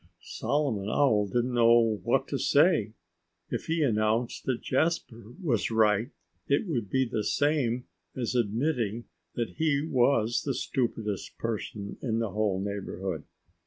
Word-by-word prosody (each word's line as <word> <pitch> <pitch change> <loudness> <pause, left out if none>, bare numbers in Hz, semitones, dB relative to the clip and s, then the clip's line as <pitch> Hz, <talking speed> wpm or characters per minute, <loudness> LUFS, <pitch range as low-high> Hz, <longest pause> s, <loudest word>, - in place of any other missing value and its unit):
Solomon 130 -9 -1
Owl 110 -6 +3
didn't 120 +5 0
know 115 -2 +4
what - - +1
to - - -2
say. 145 - +3 0.6
If - - -3
he 165 -1 +1
announced 115 0 0
that 130 -3 -1
Jasper 130 -6 -1
was 130 - 0
right 110 +1 +3 0.4
it 140 +8 +2
would 120 - -2
be 130 0 +2
the 110 -3 -2
same 130 -3 +1 0.3
as 125 -2 -2
admitting 120 -1 0 0.3
that 120 -2 -3
he 155 -3 +2
was 120 -5 +2
the 135 -3 -2
stupidest 110 -6 -2
person 105 -3 -4
in 115 -4 -1
the 115 -3 -1
whole 105 -2 0
neighborhood. 95 -4 -4
115 Hz, 135 wpm, -28 LUFS, 105-135 Hz, 0.6 s, know